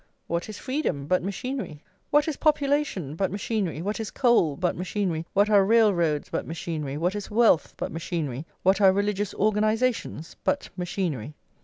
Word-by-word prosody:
What 170 Hz, +5 st, -3 dB
is 210 Hz, -, -7 dB
freedom 255 Hz, -, -2 dB
but 185 Hz, +5 st, +2 dB
machinery? 200 Hz, -, -5 dB, 0.3 s
what 295 Hz, +1 st, +3 dB
is 315 Hz, -, -1 dB
population 285 Hz, -, +1 dB
but 190 Hz, +2 st, 0 dB
machinery? 200 Hz, -5 st, -2 dB
what 210 Hz, +4 st, -2 dB
is 220 Hz, -, -3 dB
coal 230 Hz, -, +3 dB
but 180 Hz, -1 st, 0 dB
machinery? 180 Hz, -3 st, -2 dB
what 200 Hz, +1 st, +4 dB
are 205 Hz, -2 st, +5 dB
railroads 190 Hz, -8 st, +3 dB
but -, -, -2 dB
machinery? 155 Hz, -4 st, -4 dB
what 175 Hz, +4 st, 0 dB
is 205 Hz, -1 st, -5 dB
wealth 220 Hz, -6 st, +3 dB
but -, -, -4 dB
machinery? 160 Hz, -4 st, -4 dB, 0.2 s
what 190 Hz, +2 st, +3 dB
are 190 Hz, -1 st, +7 dB
religious 205 Hz, +1 st, -1 dB
organisations 215 Hz, -3 st, 0 dB
but 285 Hz, -, 0 dB
machinery? 170 Hz, -, -3 dB
195 Hz, 160 wpm, -26 LUFS, 165-220 Hz, 0.3 s, are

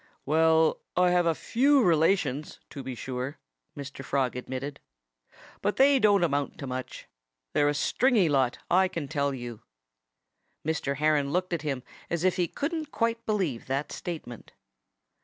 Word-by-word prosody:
"Well, 160 Hz, +1 st, +3 dB, 0.2 s
I 180 Hz, 0 st, +4 dB
have 175 Hz, -1 st, +3 dB
a 165 Hz, -, +2 dB
few 275 Hz, -, +3 dB
relations, 160 Hz, -4 st, +1 dB
to 140 Hz, -, -6 dB
be 130 Hz, -1 st, -6 dB
sure," 130 Hz, +3 st, -5 dB, 0.4 s
Mr. 140 Hz, -1 st, -7 dB
Frog 130 Hz, -2 st, 0 dB
admitted. 130 Hz, +3 st, -5 dB, 0.8 s
"But 205 Hz, -, 0 dB
they 275 Hz, 0 st, +5 dB
don't 205 Hz, -5 st, +4 dB
amount 145 Hz, -4 st, 0 dB
to 140 Hz, -, -6 dB
much. 130 Hz, 0 st, -6 dB, 0.5 s
They're 145 Hz, 0 st, +3 dB
a 145 Hz, -, -1 dB
stringy 225 Hz, -, +3 dB
lot, 135 Hz, -4 st, +2 dB
I 185 Hz, +2 st, +4 dB
can 170 Hz, -6 st, -5 dB
tell 140 Hz, -1 st, 0 dB
you." 120 Hz, -4 st, -7 dB, 1.0 s
Mr. 150 Hz, -3 st, -1 dB
Heron 150 Hz, -1 st, +2 dB
looked 180 Hz, +3 st, -1 dB
at 170 Hz, -, -1 dB
him 135 Hz, -5 st, -3 dB, 0.3 s
as 170 Hz, -1 st, -1 dB
if 185 Hz, 0 st, +2 dB
he 175 Hz, -2 st, +1 dB
couldn't 310 Hz, -, -3 dB
quite 230 Hz, 0 st, 0 dB
believe 185 Hz, -, -1 dB
that 135 Hz, +2 st, -2 dB
statement. 155 Hz, -9 st, -7 dB
155 Hz, 155 wpm, -28 LUFS, 140-185 Hz, 1.0 s, they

